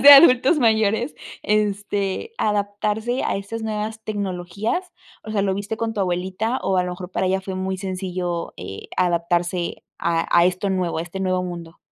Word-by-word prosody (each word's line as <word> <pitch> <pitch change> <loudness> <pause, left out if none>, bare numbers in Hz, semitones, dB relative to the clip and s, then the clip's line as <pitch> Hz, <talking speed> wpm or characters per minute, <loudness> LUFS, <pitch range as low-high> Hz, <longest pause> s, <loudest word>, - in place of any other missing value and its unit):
más - - -2
de 285 - +11
adultos 275 +1 +8
mayores, 220 +1 +2 0.3
este, 205 - 0
adaptarse 210 +3 0
a - - 0
estas 210 +3 -5
nuevas 220 0 -3
tecnologías?, 205 - -2 0.3
o 215 - -8
sea, 205 -2 +1
¿lo 195 -1 +1
viste 205 +3 -3
con 225 0 -2
tu 210 - -1
abuelita? 190 +6 0
O 190 -1 +1
a 180 - +4
lo 180 - -3
mejor 180 0 -7
para 190 - 0
ella 190 +1 +1
fue 190 0 -5
muy 190 0 -2
sencillo, 180 -2 -3
eh, 95 +2 -8
adaptarse 175 0 0
a 165 -1 +1
a 170 - +7
esto 185 +2 0
nuevo, 185 -3 0
a - - 0
este 175 +3 -6
nuevo 185 -1 +1
mundo. 170 -2 -7
195 Hz, 180 wpm, -23 LUFS, 180-215 Hz, 0.3 s, de